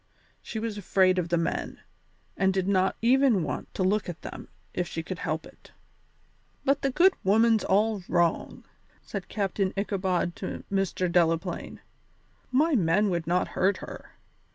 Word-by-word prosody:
She - - -7
was 220 -1 -3
afraid 185 -1 +3
of 170 -1 -2
the 170 - +2
men, 165 - -2 0.6
and 190 0 +2
did 190 -1 -1
not 190 -1 +2
even 250 -5 +4
want - - -4
to 190 - 0
look 200 +1 +1
at 170 - -8
them - - -8 0.3
if 180 -1 -1
she 165 - -4
could 180 +1 -6
help 155 +1 -3
it. - - -17 0.9
"But 275 +1 +2
the 275 - +1
good 360 +8 +5
woman's 220 +2 +4
all 210 +1 +2
wrong," 170 -1 0 0.4
said 200 -3 -6
Captain 195 -2 -1
Ichabod 190 -3 -1
to - - -5
Mr. 195 -2 0
Delaplaine; 170 0 0 0.7
"my 300 +6 +3
men 200 -1 +3
would 170 -2 -2
not 180 +2 +1
hurt 190 +2 +1
her. - - -10
190 Hz, 155 wpm, -27 LUFS, 175-215 Hz, 0.9 s, good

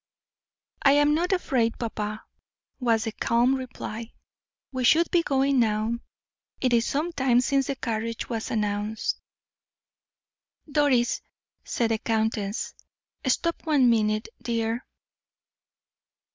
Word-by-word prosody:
"I 275 - +6
am 290 +1 +4
not 345 +5 +1
afraid, 250 -11 +1
papa," 215 -2 -4 0.6
was 230 -3 +2
the 225 - -2
calm 235 +4 +2
reply. 240 -3 -5 0.6
"We 260 -1 -2
should 330 +7 +4
be 350 - +4
going 275 -3 +2
now; 220 +1 +1 0.6
it 255 -2 +1
is 230 -1 +3
some 310 +5 -1
time 260 -5 +3
since 270 +1 +1
the 275 - -1
carriage 230 -2 -3
was 225 -2 -3
announced." 210 0 -1 1.5
"Doris," 275 -5 +2 0.4
said 230 -2 0
the 220 - +1
countess, 220 -2 -1 0.5
"stop 335 +6 0
one 270 -6 +5
minute, 215 -1 +1
dear." 230 0 -2
235 Hz, 115 wpm, -26 LUFS, 225-275 Hz, 1.5 s, I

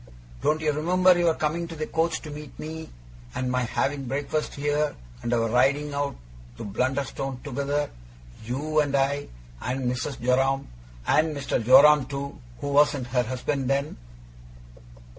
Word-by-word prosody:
'Don't 155 +1 +1
you 155 -1 +2
remember 180 +5 +4
your 170 -2 +3
coming 165 +3 -1
to 165 - -8
the 155 0 -3
coach 165 +1 0
to 155 - -7
meet 150 -1 -9
me, 160 +1 -6 0.5
and 125 0 -1
my 125 0 +1
having 135 +3 -1
breakfast 145 +3 -2
here, 145 +1 0 0.3
and 120 - -3
our 115 -1 +2
riding 140 +5 +2
out 140 0 -1 0.4
to - - -6
Blunderstone 130 +4 -2
together: 145 +1 -1 0.6
you, 145 +7 -1
and 145 -2 +1
I, 140 +1 +1 0.3
and 130 +2 -2
Mrs. 125 +2 -2
Joram, 135 +2 +2 0.4
and 155 -1 +2
Mr. 140 -4 -1
Joram 140 +4 +7
too 140 - -5 0.2
who 145 - -2
wasn't 140 -3 +3
her 125 - +4
husband 130 +2 -2
then? 140 +1 0
140 Hz, 150 wpm, -26 LUFS, 130-150 Hz, 0.6 s, Joram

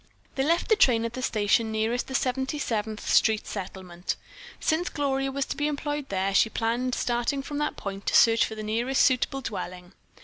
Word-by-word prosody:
They 270 - -1
left 335 +4 +1
the 440 - +6
train 245 - +4
at 230 - -4
the 255 - -5
station 220 -1 +1
nearest 220 +3 -1
the 265 - -5
Seventy 265 +3 0
seventh 220 -5 -3
Street 220 -1 +3
Settlement. 185 -3 -5 0.4
Since 335 +3 0
Gloria 270 -2 -1
was 275 0 -1
to - - -4
be 295 -1 0
employed 295 -1 -3
there, 195 0 0
she 210 +3 +4
planned 240 +3 -1
starting 240 +3 -1
from 290 +1 -4
that 295 - -1
point 195 0 -6
to - - +2
search 230 -1 +6
for 220 - -3
the 215 - -6
nearest 235 +5 +1
suitable 270 +1 +2
dwelling. 180 -5 -6
240 Hz, 195 wpm, -27 LUFS, 215-275 Hz, 0.4 s, the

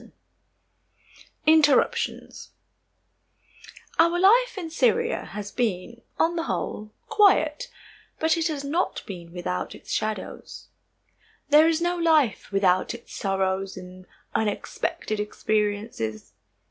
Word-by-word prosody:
CHAPTER - - -19
XI - - -30 0.3
INTERRUPTIONS 295 -4 +2 1.5
Our 335 +1 +4
life 465 +6 +4
in 335 -4 -5
Syria 470 +5 +1
has 205 -1 -7
been, 235 0 -2 0.2
on 340 +1 +2
the 335 - -1
whole, 215 0 -4 0.2
quiet, 400 -9 +3 0.5
but 320 +1 +2
it 330 0 0
has 295 -3 -4
not 310 +6 -1
been 175 -4 -9
without 90 - -4
its - - -11
shadows. 215 0 -4 0.8
There 305 +2 +7
is 330 0 +1
no 350 0 0
life 310 - +2
without 190 +1 +2
its 235 - -13
sorrows 195 -1 -1
and 185 0 -11 0.3
unexpected 215 0 -2
experiences. 210 - -2
235 Hz, 110 wpm, -25 LUFS, -, 1.5 s, There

